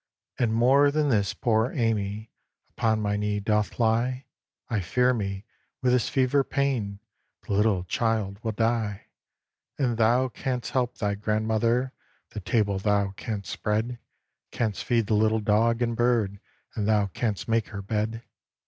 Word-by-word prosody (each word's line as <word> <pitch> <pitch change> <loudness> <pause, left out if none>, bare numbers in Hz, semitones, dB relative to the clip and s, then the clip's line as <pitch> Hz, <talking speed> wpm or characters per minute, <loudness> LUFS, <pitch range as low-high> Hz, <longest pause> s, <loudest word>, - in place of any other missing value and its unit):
"And 120 -3 +2
more 130 +5 +5
than 150 0 +1
this, 100 -6 +1
poor 115 +1 +1
Amy 110 -3 -1 0.4
Upon 110 -2 0
my 105 0 0
knee 105 0 -1
doth 105 0 0
lie; 120 +3 +1 0.4
I 115 - -1
fear 125 +8 +2
me, 100 -3 -3 0.4
with 125 - +3
this 125 -1 +2
fever 135 +1 +2
pain 130 -8 -1 0.5
The - - -3
little 100 -3 +2
child 105 0 -1
will 110 -1 -1
die! 110 -2 -1 0.7
"And 125 -5 0
thou 120 +3 +3
canst 125 0 -3
help 125 -2 -1
thy 105 -2 0
grandmother; 110 +4 0 0.4
The 110 - -5
table 100 0 0
thou 100 -1 +1
canst 100 -2 -5
spread, 110 +3 -2 0.5
Canst 110 -4 -2
feed 115 -3 +1
the 110 - -1
little 110 +1 +3
dog 115 +3 +2
and 115 -1 -1
bird, 115 -5 +1 0.3
And 105 -1 -2
thou 105 -2 +3
canst 105 +2 -3
make 115 -2 +1
her 100 -1 -7
bed. 110 +2 -2
110 Hz, 150 wpm, -26 LUFS, 105-120 Hz, 0.7 s, more